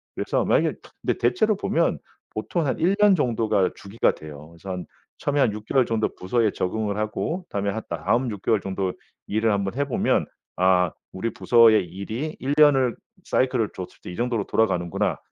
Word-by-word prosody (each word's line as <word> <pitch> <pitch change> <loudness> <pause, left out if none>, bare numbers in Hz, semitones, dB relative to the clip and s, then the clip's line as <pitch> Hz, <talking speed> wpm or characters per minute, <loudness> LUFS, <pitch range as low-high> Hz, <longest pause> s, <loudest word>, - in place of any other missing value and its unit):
그래서 - - 0
만약에 - - +2 0.3
근데 - - 0
대체로 215 - +2
보면 - - +1 0.3
보통 170 -3 -2
한 135 - 0
1 185 +4 +3
년 205 -2 +7
정도가 110 - +1
주기가 100 +4 0
돼요. 75 0 -11
그래서 85 +3 -8
한 90 -1 -4 0.3
처음에 145 0 -1
한 110 - +3
6 105 0 -8
개월 130 0 +3
정도 110 -1 -1
부서에 110 +4 +1
적응을 105 +2 -2
하고 160 - -2
다음에 100 0 -1
한 110 - -4
다음 110 - 0
6 100 - -7
개월 110 0 +2
정도 95 -1 -2 0.4
일을 110 +1 +1
한번 100 0 -1
해 140 +1 0
보면 135 - +1 0.3
아 90 -2 +3 0.2
우리 110 +4 -2
부서의 115 -5 +5
일이 110 - -5
1 135 +2 -1
년을 135 -5 +5 0.3
사이클을 125 -4 +1
줬을 90 - -8
때 - - -7
이 - - -7
정도로 120 -3 0
돌아가는구나 90 -6 0
110 Hz, 350 characters per minute, -24 LUFS, 95-130 Hz, 0.4 s, 년